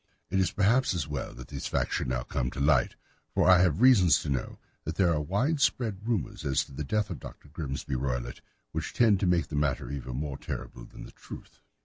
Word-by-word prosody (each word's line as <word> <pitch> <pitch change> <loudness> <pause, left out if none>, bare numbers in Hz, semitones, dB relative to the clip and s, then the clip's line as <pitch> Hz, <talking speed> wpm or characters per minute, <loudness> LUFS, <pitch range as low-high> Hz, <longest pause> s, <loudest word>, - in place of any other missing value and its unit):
It 95 - +2
is 95 -3 +3
perhaps 110 +2 +2
as 80 -5 -2
well 75 -2 -4
that 60 +1 -10
the - - -6
facts - - -1
should - - -2
now 60 -1 -1
come 60 0 -2
to 70 - -7
light, 70 -1 +3 0.4
for - - +3
I 90 -1 +7
have 90 0 +2
reasons 115 -10 +6
to 75 - -4
know 65 -2 -2 0.3
that 80 - -4
there 90 -3 +3
are 75 - 0
widespread 110 - 0
rumours 115 -6 -2
as 70 -1 +1
to - - -17
the 70 +3 -5
death 105 +7 -1
of 80 - -5
Dr. 75 - -11
Grimesby 70 -3 -5
Roylott 60 -2 -3 0.3
which - - -4
tend 110 -5 +4
to 95 - +1
make 90 -1 +2
the 75 - -4
matter 70 -3 0
even 65 -3 -5
more 70 0 -4
terrible - - -6
than - - -12
the - - -10
truth. - - -12
80 Hz, 225 wpm, -29 LUFS, 70-100 Hz, 0.4 s, I